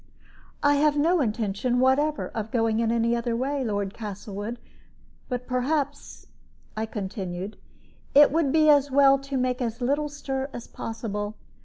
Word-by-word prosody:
"I 290 0 +4
have 295 0 +3
no 330 +3 +3
intention 225 +1 0
whatever 280 +4 +2
of 220 -1 -4
going 225 -1 +1
in 230 -1 +1
any 235 0 +2
other 235 0 -1
way, 270 +3 -1
Lord 205 -4 -2
Castlewood; 205 +1 -6 0.7
but 250 -1 -3
perhaps," 280 +3 -2 0.5
I 220 +1 -2
continued, 195 -2 -5 0.6
"it 290 0 +8
would 310 -3 +1
be 310 0 +4
as 285 -2 +5
well 275 0 +5
to 275 0 -4
make 255 0 0
as 235 -1 -2
little 285 +4 0
stir 270 -2 -4
as 240 - -7
possible. 210 -2 -5
250 Hz, 150 wpm, -26 LUFS, 220-280 Hz, 0.7 s, it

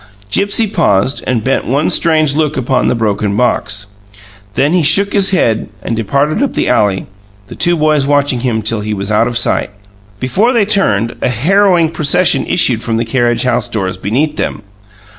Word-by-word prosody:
Gipsy 200 - +2
paused 140 - 0
and 120 -4 -1
bent 135 +3 -1
one 140 +5 0
strange 155 -4 +2
look 150 -2 -1
upon 130 0 0
the - - +1
broken 105 -2 -1
box. 105 -5 -1 0.7
Then 145 +4 +1
he 180 - +3
shook 200 +6 +2
his 200 -1 +3
head 115 - 0
and 115 - -3
departed 140 - -1
up 280 - -1
the - - 0
alley, 100 -3 +1 0.4
the - - -11
two 175 -1 +2
boys 150 -2 +1
watching 145 -3 +1
him 115 -3 -2
till 110 +1 -1
he 105 0 -3
was 100 +1 -4
out 110 +2 +2
of 120 -1 -1
sight. 120 - 0 0.5
Before 195 - +1
they 225 -4 +2
turned, 120 - 0
a - - +1
harrowing 170 - +2
procession 155 -3 +1
issued - - +2
from 115 -1 -2
the 115 - -1
carriage 120 0 0
house 120 -1 -1
doors 95 -5 -3
beneath 135 +11 -2
them. - - -4
130 Hz, 180 wpm, -13 LUFS, 110-160 Hz, 0.7 s, he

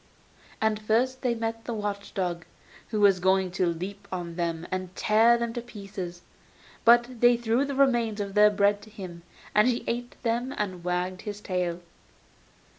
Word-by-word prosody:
And 220 -1 +1
first 245 +5 +1
they 245 -3 +1
met 225 0 -4
the 235 - -3
watch 205 -1 -4
dog, 175 -3 -2 0.4
who 215 - -2
was 195 -2 +5
going 190 0 +2
to 185 0 0
leap 185 +4 -4
on 175 -2 -4
them 170 -1 -2
and 185 0 -4
tear 225 +3 +4
them 235 -1 -2
to 240 - -3
pieces; 195 -6 -8 0.6
but 240 +1 +5
they 240 0 +6
threw 235 +3 +1
the 280 -1 -4
remains 240 -6 +2
of 200 -1 -3
their 210 +1 +7
bread 205 0 +2
to 215 - -14
him, 185 -5 -9 0.3
and 210 +2 +5
he 245 -1 0
ate 240 +1 -3
them 240 +3 -1
and 185 -4 -3
wagged 180 +1 -2
his 205 -1 -6
tail. 180 -3 -2
210 Hz, 175 wpm, -27 LUFS, 185-235 Hz, 0.6 s, their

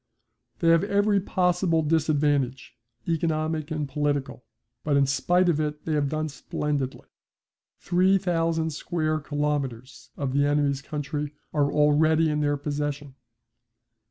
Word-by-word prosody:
They 165 - +2
have 165 +2 +5
every 205 0 +2
possible 180 -3 +1
disadvantage, 145 -4 0 0.3
economic 160 -2 -1
and 155 -2 -2
political. 145 -2 -2 0.4
But 145 -2 +2
in 140 - +4
spite 175 +7 +2
of 165 -3 +2
it 150 -1 -3
they 160 - -1
have 145 -2 +1
done 155 +1 -2
splendidly. 140 -1 -3 0.7
Three 185 +2 +3
thousand 165 -3 0
square 155 0 -2
kilometres 135 -6 -3
of 135 -3 -2
the 140 +1 +3
enemy's 145 -1 +1
country 150 0 -4 0.2
are 145 -2 +2
already 155 +2 +3
in 150 0 0
their 145 -1 +1
possession. 145 -1 -4
150 Hz, 130 wpm, -25 LUFS, 145-165 Hz, 0.7 s, have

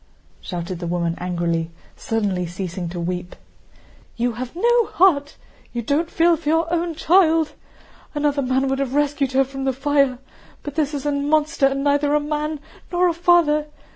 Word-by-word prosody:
shouted 175 0 -5
the 175 - -4
woman 170 -1 -1
angrily, 170 -2 -1 0.3
suddenly 200 -6 -1
ceasing 180 0 -5
to 175 +1 -6
weep. 180 +1 -4 0.8
"You 240 +1 +1
have 245 +4 -6
no 475 +4 +3
heart, 295 -6 +2 0.4
you 240 -1 -3
don't 300 +7 0
feel 340 0 +3
for 310 -2 -4
your 325 +1 +1
own 340 -1 -1
child! 325 -2 +3 0.6
Another 290 -1 +1
man 260 +1 +1
would 270 0 -1
have 275 -1 -2
rescued 290 -2 +1
her 270 +1 +4
from 270 0 -6
the 265 0 +1
fire. 275 -1 +1 0.5
But 290 - -6
this 300 -1 -1
is 280 0 -5
a 290 - +1
monster 295 0 +2
and 275 0 -2
neither 285 +1 +2
a - - +4
man 300 +1 -3 0.3
nor 355 0 +3
a - - 0
father! 330 -3 +3
285 Hz, 170 wpm, -21 LUFS, 230-310 Hz, 0.8 s, her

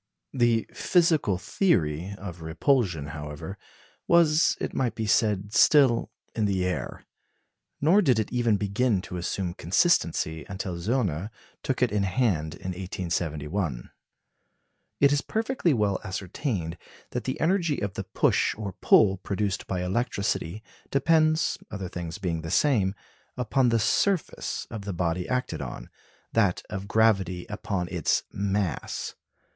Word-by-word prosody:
The 120 -3 +2
physical 160 - +2
theory 90 - 0
of 90 -3 -8
repulsion, 80 - +1
however, 75 +5 -7 0.5
was, 165 -2 +4
it - - -3
might 125 -3 0
be 110 - -2
said, 105 -1 +1
still 130 +1 +5 0.2
in 110 - 0
the 95 -2 +1
air. 90 - -4 0.7
Nor 170 +8 +5
did 130 - +3
it 110 -2 -1
even 120 -4 +2
begin 100 0 0
to 90 - -6
assume 90 0 -2
consistency 85 - +1
until 95 -2 -4
Zöllner 100 - -1 0.3
took 130 -2 0
it 125 - +2
in 105 -1 +1
hand 90 - 0
in 95 - -7
1871. 85 -5 -3 1.1
It 140 0 +5
is 145 0 +2
perfectly 225 -5 0
well 105 -7 +1
ascertained 95 - -3 0.3
that - - -3
the - - -3
energy 170 -3 +1
of 100 -3 -3
the - - -5
push - - +1
or 105 -3 -5
pull 100 -3 +5
produced 100 0 -2
by 90 -1 -2
electricity 100 -1 -1 0.3
depends 155 +2 +2
(other 95 -3 -5
things 85 -2 -5
being 85 -3 -2
the 80 - -6
same) 100 - +2 0.4
upon 125 +1 +2
the 115 - +3
surface 180 - 0
of 110 -3 -5
the 100 -1 -4
body 85 0 -1
acted 125 0 -1
on; - - -7 0.4
that 100 -6 +2
of 100 -1 -5
gravity 100 -5 +2
upon 100 -4 -3
its 90 -3 +1
mass. 100 -5 -2
100 Hz, 135 wpm, -27 LUFS, 90-125 Hz, 1.1 s, still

